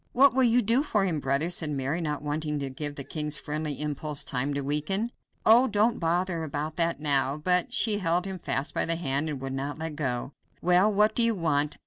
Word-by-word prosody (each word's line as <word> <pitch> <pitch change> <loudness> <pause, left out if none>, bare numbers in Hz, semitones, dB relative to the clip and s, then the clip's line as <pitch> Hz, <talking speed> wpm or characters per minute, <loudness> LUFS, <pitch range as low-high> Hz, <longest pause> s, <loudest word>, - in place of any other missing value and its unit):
"What 275 +1 +5
will 265 - +2
you 245 0 +3
do 230 +6 +3
for 210 -9 0
him, 165 -5 -1
brother?" 140 +5 -1
said 160 -3 0
Mary, 145 +4 -2
not 150 -3 -3
wanting 150 0 -2
to 140 -2 -4
give 145 +2 -4
the 140 - -5
king's 150 +1 -3
friendly 150 -1 -4
impulse 150 0 -2
time 130 +2 -2
to 140 - -1
weaken. 155 - -1 0.3
"Oh! 240 +4 +6
don't 215 +2 +1
bother 170 0 -1
about 155 +1 -4
that 170 -2 0
now," 140 -1 +1
but 180 +3 +1
she 210 -2 +3
held 175 0 +1
him 190 -1 -5
fast 135 -3 -3
by - - 0
the 165 - 0
hand 150 -2 -1
and 145 -3 -4
would 135 0 -5
not 140 +2 -4
let 160 -1 -5
go. 130 -3 -3 0.3
"Well, 180 +4 +3
what 210 +1 +3
do 240 - +4
you 230 -1 +6
want? 150 -4 0
155 Hz, 225 wpm, -27 LUFS, 145-190 Hz, 0.3 s, Oh